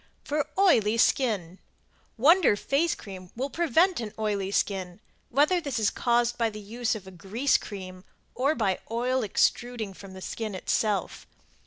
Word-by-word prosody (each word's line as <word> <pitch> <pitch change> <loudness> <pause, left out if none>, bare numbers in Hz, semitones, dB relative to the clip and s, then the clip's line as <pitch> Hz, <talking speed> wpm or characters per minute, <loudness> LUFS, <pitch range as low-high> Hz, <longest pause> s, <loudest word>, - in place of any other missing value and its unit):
FOR 295 -1 -1
OILY 230 - +4
SKIN 205 -8 +1 0.6
Wonder 320 - +5
Face 285 +10 0
Cream 185 -3 -10
will 265 +4 -3
prevent 340 +2 +2
an 220 -3 -4
oily 205 -3 -1
skin, 190 -2 -1 0.3
whether 300 +8 +3
this 280 -6 -3
is 215 -2 +2
caused 240 0 +1
by 230 -1 +2
the 215 -1 -8
use 225 +3 -2
of 205 -3 -8
a 190 - -10
grease 200 +10 0
cream, 185 -3 -4 0.3
or 280 +5 +1
by 195 -5 0
oil 250 +3 0
extuding 225 0 0
from 195 0 -11
the 190 - -10
skin 215 +1 -4
itself. 200 0 -1
225 Hz, 155 wpm, -27 LUFS, 195-265 Hz, 0.6 s, Wonder